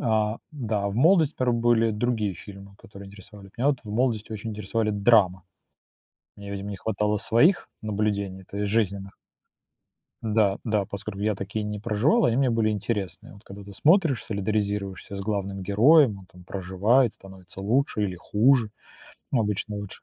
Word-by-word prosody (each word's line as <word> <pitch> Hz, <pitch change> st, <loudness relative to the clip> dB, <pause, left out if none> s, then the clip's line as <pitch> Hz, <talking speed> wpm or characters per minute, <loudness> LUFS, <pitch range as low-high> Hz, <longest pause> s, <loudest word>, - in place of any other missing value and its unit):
А, 110 Hz, -1 st, 0 dB
да, 110 Hz, -8 st, -2 dB
а -, -, 0 dB
в -, -, -6 dB
молодости, 160 Hz, +1 st, +4 dB
порой, 125 Hz, -2 st, +1 dB
были 115 Hz, -1 st, +3 dB
другие 105 Hz, -3 st, -1 dB
фильмы, 100 Hz, +2 st, -12 dB
которые 100 Hz, 0 st, -12 dB
интересовали. 100 Hz, 0 st, -13 dB
Меня 140 Hz, +4 st, +2 dB
в 105 Hz, -, -8 dB
молодости 110 Hz, -2 st, -1 dB
очень 110 Hz, +1 st, -5 dB
интересовали 105 Hz, +1 st, -2 dB
драма. 100 Hz, -3 st, +3 dB, 0.9 s
Мне, 100 Hz, 0 st, -9 dB
видимо, 100 Hz, 0 st, -5 dB
не 100 Hz, -, -5 dB
хватало 105 Hz, 0 st, -1 dB
своих 155 Hz, -, +3 dB
наблюдений, 100 Hz, -2 st, -2 dB
то 100 Hz, -, -10 dB
есть 105 Hz, -1 st, -1 dB
жизненных. 100 Hz, -3 st, -1 dB, 1.1 s
Да, 105 Hz, -3 st, +2 dB
да, 105 Hz, -3 st, 0 dB
поскольку 100 Hz, 0 st, -7 dB
я 105 Hz, -1 st, +1 dB
такие 100 Hz, +3 st, -4 dB
не 105 Hz, 0 st, -4 dB
проживал, 120 Hz, -, +2 dB
они 120 Hz, +1 st, +2 dB
мне 135 Hz, -2 st, +3 dB
были 115 Hz, -2 st, +1 dB
интересные. 105 Hz, -1 st, -4 dB
Вот 100 Hz, +2 st, -16 dB
как 100 Hz, -, -11 dB
бы 100 Hz, -, -10 dB
ты 100 Hz, 0 st, -11 dB
смотришь, 160 Hz, -, +3 dB
солидаризируешься 100 Hz, -2 st, -3 dB
с 100 Hz, -, -5 dB
главным 100 Hz, -1 st, -3 dB
героем, 110 Hz, -, +4 dB
он 95 Hz, -, -15 dB
там 90 Hz, 0 st, -17 dB
проживает, 100 Hz, +7 st, +1 dB
становится 95 Hz, 0 st, -12 dB
лучше 110 Hz, +1 st, +1 dB
или 95 Hz, -3 st, -2 dB
хуже, 110 Hz, +4 st, +2 dB, 0.6 s
ну 120 Hz, -, +3 dB
обычно 105 Hz, 0 st, -2 dB
лучше. 100 Hz, -1 st, -8 dB
105 Hz, 170 wpm, -25 LUFS, 100-115 Hz, 1.1 s, молодости